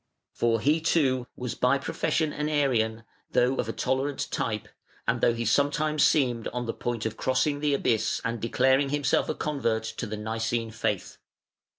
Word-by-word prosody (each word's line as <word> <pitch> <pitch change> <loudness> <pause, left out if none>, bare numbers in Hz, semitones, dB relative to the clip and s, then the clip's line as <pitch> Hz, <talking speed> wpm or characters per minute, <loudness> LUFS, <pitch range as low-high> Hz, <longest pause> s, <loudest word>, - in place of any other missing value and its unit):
For 115 -1 +1
he, 150 +7 +2
too, 130 -7 +2
was 125 -2 -4
by 125 +2 +2
profession 155 +2 -1
an 150 +1 -2
Arian, 115 -7 +1 0.3
though 130 +2 +3
of 115 - -1
a - - +1
tolerant 135 +4 -1
type, 110 -2 -2 0.4
and 115 0 +1
though 120 - +3
he 115 0 -3
sometimes 145 +5 +2
seemed 125 -6 +2
on 120 0 -3
the 115 - -2
point 120 -2 -3
of 110 0 -3
crossing 130 +3 +1
the 145 -1 +2
abyss 110 -5 +1
and 115 -1 -2
declaring 130 +4 +2
himself 145 -2 +1
a - - -1
convert 125 -7 -1
to 110 +1 -5
the 105 +1 -5
Nicene 115 +1 -2
faith. 105 -3 -3
125 Hz, 175 wpm, -27 LUFS, 115-145 Hz, 0.4 s, though